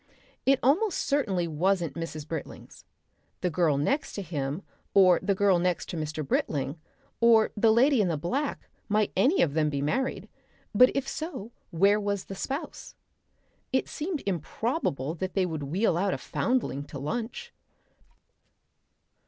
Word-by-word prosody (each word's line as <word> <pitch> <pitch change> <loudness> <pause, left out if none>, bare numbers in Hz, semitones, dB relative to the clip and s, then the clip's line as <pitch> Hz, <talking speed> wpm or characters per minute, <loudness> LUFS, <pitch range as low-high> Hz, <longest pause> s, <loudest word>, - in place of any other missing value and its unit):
It 270 0 +6
almost 340 - +3
certainly 195 - 0
wasn't 170 0 0
Mrs. 160 -2 -6
Britling's. 160 -2 -8 0.6
The 180 - 0
girl 160 -4 +2
next 275 - 0
to 200 - -4
him 150 0 -3 0.3
or 185 -3 +6
the 200 - +1
girl 195 -2 +3
next 175 -4 -1
to - - -4
Mr. 155 -2 -4
Britling 140 +2 -1 0.4
or 230 -2 +5
the 220 +1 +4
lady 255 +2 +4
in 195 - +2
black 265 - -2 0.2
might 210 0 +2
any 270 - +4
of 145 - 0
them 155 -1 +2
be 140 -1 -2
married, 260 - -1 0.5
but 250 +5 +7
if 275 -1 -1
so 280 - -5 0.2
where 200 +5 +3
was 200 -2 -2
the - - -7
spouse? 275 - -5 0.8
It 260 - +1
seemed 315 0 -4
improbable 180 - -2
that 185 +3 -5
they 190 -2 +2
would 160 -4 -4
wheel 170 +7 +1
out 190 +3 +1
a - - -4
foundling 240 - -1
to 145 - -8
lunch.... 235 - -4
190 Hz, 150 wpm, -28 LUFS, 160-240 Hz, 0.8 s, but